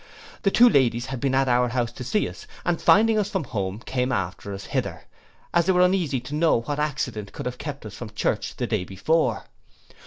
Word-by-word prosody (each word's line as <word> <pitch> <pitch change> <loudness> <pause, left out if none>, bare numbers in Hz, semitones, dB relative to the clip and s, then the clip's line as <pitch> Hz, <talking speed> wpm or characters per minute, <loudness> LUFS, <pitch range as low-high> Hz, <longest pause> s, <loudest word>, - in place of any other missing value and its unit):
The 195 - +3
two 240 +5 +6
ladies 125 - +3
had 130 -1 -5
been 135 0 0
at 135 0 +3
our 125 0 +3
house 120 -1 -1
to 125 - -8
see 210 - 0
us, - - -10 0.2
and 175 -1 0
finding 220 +1 +5
us 205 -1 0
from 190 -5 -1
home, 100 -6 -3
came 125 0 -1
after 95 -2 -3
us 100 0 -6
hither, - - -3 0.5
as 170 0 +3
they 190 - +4
were 180 - +4
uneasy 180 -8 +1
to 130 +4 -8
know 155 -6 +3
what 145 +4 -3
accident 125 -9 -2
could - - -6
have 125 0 -4
kept 140 -4 -6
us 105 - -8
from 115 +2 -7
church 105 - -2
the - - -2
day - - -1
before. 155 - 0
130 Hz, 220 wpm, -24 LUFS, 115-165 Hz, 0.5 s, two